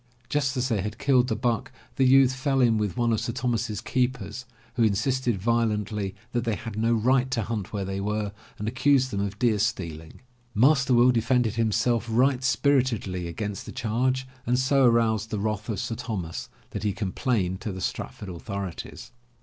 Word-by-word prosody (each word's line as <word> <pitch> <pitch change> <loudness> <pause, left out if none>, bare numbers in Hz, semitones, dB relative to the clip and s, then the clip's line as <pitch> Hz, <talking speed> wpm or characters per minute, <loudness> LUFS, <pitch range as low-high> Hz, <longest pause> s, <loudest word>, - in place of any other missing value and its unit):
Just 135 -3 0
as 125 0 +1
they 110 -5 +1
had 105 +3 -4
killed 130 -2 +3
the 110 - 0
buck 120 +1 -1 0.2
the 135 - +3
youths 130 0 +6
fell 135 +1 0
in 115 -4 +4
with 105 -4 -2
one 120 -1 +2
of 110 - +1
Sir 115 - -3
Thomas's 115 -4 -1
keepers, 125 -2 -2 0.3
who 120 - -1
insisted 115 +1 +1
violently 105 -3 0 0.2
that 120 -1 0
they 115 -3 0
had 110 -1 -7
no 115 +2 +2
right 125 +3 +2
to 120 -4 0
hunt 105 -3 -4
where 100 -2 -3
they 95 +1 -3
were 105 0 -2 0.3
and 105 - -4
accused 130 +2 +2
them 100 - -2
of 100 0 -2
deer 115 -3 +2
stealing. 85 -8 -3 0.3
Master 135 +3 +4
Will 120 +2 +6
defended 120 -1 +2
himself 115 +1 +1
right 125 +3 +2
spiritedly 125 -11 +1
against 100 +4 -5
the - - -6
charge 125 +2 -1 0.2
and 125 +1 +3
so 130 +1 +3
aroused 110 -3 +3
the 110 - -2
wrath 105 +1 -2
of 105 -4 -2
Sir 115 - -3
Thomas 105 -8 -5 0.2
that - - -4
he 105 -2 0
com 100 -3 -3
plained 95 -7 -1
to 105 - -3
the 95 - -6
Stratford 100 +2 -4
authorities. 95 +1 -6
115 Hz, 190 wpm, -26 LUFS, 105-125 Hz, 0.3 s, youths